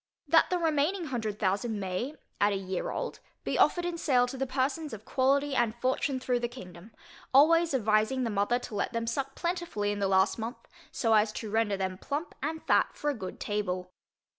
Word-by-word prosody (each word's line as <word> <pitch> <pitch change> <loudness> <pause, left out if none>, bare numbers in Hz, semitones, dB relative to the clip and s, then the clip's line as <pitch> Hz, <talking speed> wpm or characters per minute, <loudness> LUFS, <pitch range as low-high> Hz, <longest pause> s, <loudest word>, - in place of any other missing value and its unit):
That - - +5
the 360 - +1
remaining 325 +2 +1
hundred 225 -7 -3
thousand 210 +2 0
may, 195 +10 -3 0.2
at 205 +1 +4
a - - 0
year 190 -1 -3
old, - - -4 0.2
be - - -1
offered 350 -1 +4
in 345 -1 -3
sale 255 -6 +3
to 270 - -6
the 265 0 -2
persons 275 +3 -1
of 215 0 -8
quality 280 +2 +2
and 240 -3 +1
fortune, 260 +1 0
through 250 -1 0
the 240 - -1
kingdom, 190 -4 -11 0.4
always 330 +2 +6
advising 220 +2 +2
the 230 - -1
mother 205 +4 +2
to 245 - -8
let 210 - -1
them 230 0 -1
suck 270 +4 -2
plentifully 340 - -2
in 205 - -3
the 200 - +1
last 190 +3 +3
month, 230 +4 -6 0.2
so 225 -2 +1
as 215 0 +4
to 215 -2 -5
render 220 -2 +1
them 190 -1 -3
plump, 295 +4 -4
and 315 +3 -3
fat - - +3
for 295 - -1
a - - -5
good 190 -5 -7
table. 185 -3 -2
240 Hz, 205 wpm, -29 LUFS, 205-280 Hz, 0.4 s, always